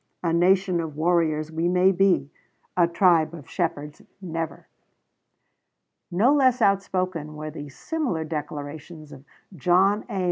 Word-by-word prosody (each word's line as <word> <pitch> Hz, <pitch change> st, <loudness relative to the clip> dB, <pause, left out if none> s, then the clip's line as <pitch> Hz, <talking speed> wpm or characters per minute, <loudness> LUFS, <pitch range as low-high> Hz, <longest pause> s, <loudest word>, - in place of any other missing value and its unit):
A 165 Hz, -1 st, 0 dB
nation 185 Hz, +1 st, +3 dB
of 160 Hz, -3 st, -6 dB
warriors 160 Hz, -2 st, +1 dB
we 165 Hz, +2 st, -1 dB
may 180 Hz, +1 st, +4 dB
be; 180 Hz, -7 st, +2 dB, 0.4 s
a 175 Hz, -2 st, +4 dB
tribe 170 Hz, -2 st, +3 dB
of 150 Hz, -5 st, -12 dB
shepherds 150 Hz, -4 st, -3 dB, 0.2 s
never. 165 Hz, -3 st, -5 dB, 1.4 s
No 215 Hz, +11 st, +3 dB
less 260 Hz, -3 st, +3 dB
outspoken 185 Hz, -6 st, 0 dB
were 155 Hz, 0 st, -6 dB
the 145 Hz, -1 st, -8 dB
similar 250 Hz, -, -3 dB
declarations 150 Hz, 0 st, -7 dB
of 135 Hz, -, -12 dB, 0.3 s
John 185 Hz, +6 st, +2 dB
A. 195 Hz, -, -3 dB
170 Hz, 130 wpm, -24 LUFS, 155-190 Hz, 1.4 s, may